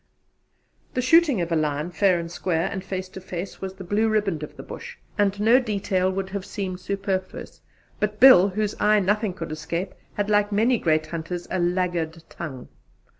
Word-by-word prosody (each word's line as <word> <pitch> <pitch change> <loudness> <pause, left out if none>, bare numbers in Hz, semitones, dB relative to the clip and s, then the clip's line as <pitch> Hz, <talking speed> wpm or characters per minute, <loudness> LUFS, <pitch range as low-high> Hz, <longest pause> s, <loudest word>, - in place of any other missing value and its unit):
The 255 - +1
shooting 295 - +5
of 170 0 -3
a - - +3
lion, 155 +1 -1
fair 180 0 +3
and 170 0 -6
square, 175 0 -1
and 190 -2 -4
face 190 -1 -4
to 190 - -9
face, 180 +1 -6
was 190 0 -5
the 190 - -9
Blue 210 +5 +1
Riband 205 -7 0
of 150 - -8
the - - -8
Bush, 480 +1 -9 0.2
and 200 -1 +1
no 230 +5 +5
detail 195 -5 0
would 190 0 -4
have 200 -1 -3
seemed 190 -3 -5
superfluous; 190 0 -4 0.4
but 210 0 -1
Bill, 205 -8 +8
whose 210 +2 -1
eye 210 0 +4
nothing 205 +1 +1
could 165 -3 -6
escape, 170 +4 -4 0.2
had, 205 0 -1
like 205 0 +2
many 225 +4 +3
great 155 -2 +2
hunters, 170 +2 -5
a 185 - 0
laggard 175 -2 -1
tongue. 135 -7 -7
190 Hz, 185 wpm, -24 LUFS, 175-210 Hz, 0.4 s, Bill